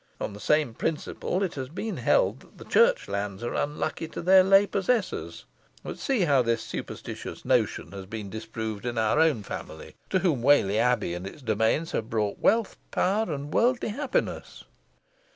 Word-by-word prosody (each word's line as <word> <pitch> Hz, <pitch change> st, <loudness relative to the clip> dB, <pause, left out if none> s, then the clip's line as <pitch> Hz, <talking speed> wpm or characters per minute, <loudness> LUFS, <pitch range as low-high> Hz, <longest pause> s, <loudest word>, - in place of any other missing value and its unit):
On -, -, -4 dB
the 100 Hz, -, -10 dB
same 150 Hz, +1 st, +2 dB
principle 165 Hz, -, -2 dB
it 185 Hz, -, -2 dB
has 130 Hz, -2 st, -5 dB
been 210 Hz, +8 st, -4 dB
held -, -, +1 dB
that -, -, -13 dB
church -, -, +4 dB
lands 100 Hz, +1 st, -3 dB
are 120 Hz, -, -3 dB
unlucky 150 Hz, +2 st, -2 dB
to 160 Hz, -, -7 dB
their 185 Hz, +1 st, +7 dB
lay 195 Hz, +1 st, +6 dB
possessors; 205 Hz, +3 st, -1 dB, 0.4 s
but -, -, -7 dB
see 265 Hz, -6 st, 0 dB
how 140 Hz, -7 st, +4 dB
this 115 Hz, -1 st, 0 dB
superstitious -, -, -7 dB
notion -, -, +1 dB
has 95 Hz, -1 st, -8 dB
been 105 Hz, 0 st, -6 dB
disproved 110 Hz, +1 st, -5 dB
in 120 Hz, -1 st, -3 dB
our 110 Hz, +6 st, +2 dB
own 155 Hz, -10 st, +3 dB
family, 80 Hz, -4 st, -8 dB, 0.2 s
to 190 Hz, -, +2 dB
whom 170 Hz, -9 st, +1 dB
Whalley 115 Hz, -6 st, +4 dB
Abbey 120 Hz, -7 st, +1 dB
and 90 Hz, +2 st, -5 dB
its 140 Hz, +7 st, -11 dB
domains 110 Hz, +8 st, +1 dB
have 110 Hz, 0 st, -3 dB
brought 105 Hz, -3 st, -1 dB
wealth, 225 Hz, -2 st, +2 dB
power, 200 Hz, 0 st, +1 dB
and 145 Hz, 0 st, -5 dB
worldly 245 Hz, 0 st, +2 dB
happiness." 265 Hz, +5 st, -3 dB
145 Hz, 170 wpm, -27 LUFS, -, 0.4 s, their